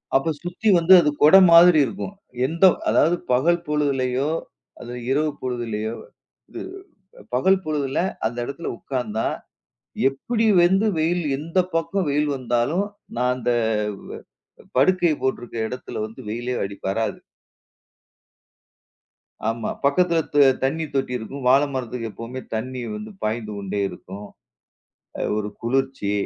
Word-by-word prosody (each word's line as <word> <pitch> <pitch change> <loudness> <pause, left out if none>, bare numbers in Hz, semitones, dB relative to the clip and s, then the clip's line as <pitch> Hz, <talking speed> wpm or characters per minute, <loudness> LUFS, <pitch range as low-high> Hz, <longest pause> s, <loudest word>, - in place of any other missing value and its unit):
அப்ப 160 +4 +2
சுத்தி 180 +5 -1
வந்து 170 +3 +6
அது 150 - +2
கொட 155 +5 +8 0.2
மாதிரி 170 -1 +8
இருக்கும். 130 - -6 0.3
எந்த 165 +6 +2 0.2
அதாவது 165 +3 +3 0.2
பகல் 170 +7 +2
பொழுதிலயோ, 140 -2 0 0.5
அது 120 - -8 0.2
இரவு 150 +3 +1
பொழுதிலயோ 115 -3 -3 0.6
இது - - -7 0.7
பகல் 190 +9 +3
பொழுதில 145 -3 -1 0.3
அந்த 115 +2 -2
எடத்துல 140 +6 -5
உட்காந்தா, 115 -5 -3 0.8
எப்படி 220 - -2
வந்து 190 +5 +4
வெயில் 170 +2 +1
எந்த 165 +5 -5 0.2
பக்கம் 165 +2 0
வெயில் 150 +1 +1
வந்தாலும், 130 +9 0 0.3
நான் 125 +1 +2
அந்த 125 -1 -1 1.3
படுக்கை 175 +3 +4
போட்டிருக்க 120 -3 -2
எடத்துல 125 -2 -6
வந்து 110 +4 -14
வெயிலே 120 +3 -3
அடிப் 100 0 -9
வராது. 110 +3 -1 2.3
ஆமா. 115 0 -3 0.2
பக்கத்துல 170 +4 +3
த - - 0 0.3
தண்ணி 160 +4 0
தொட்டி 135 -2 -1
இருக்கும். 130 +4 -8
வாழ 135 +3 +6
மரத்துக்கு 125 -3 -4
எப்பவுமே 120 +4 -7
தண்ணி 125 +3 -4
வந்து 215 0 -7
பாய்ந்து 110 0 -2
கொண்டே 100 0 -3
இருக்கும். 100 +3 -10 0.9
அ - - -4 0.2
ஒரு 105 -1 -3
குளிர்ச்சி. 130 -3 -1
135 Hz, 120 wpm, -23 LUFS, 120-165 Hz, 2.3 s, கொட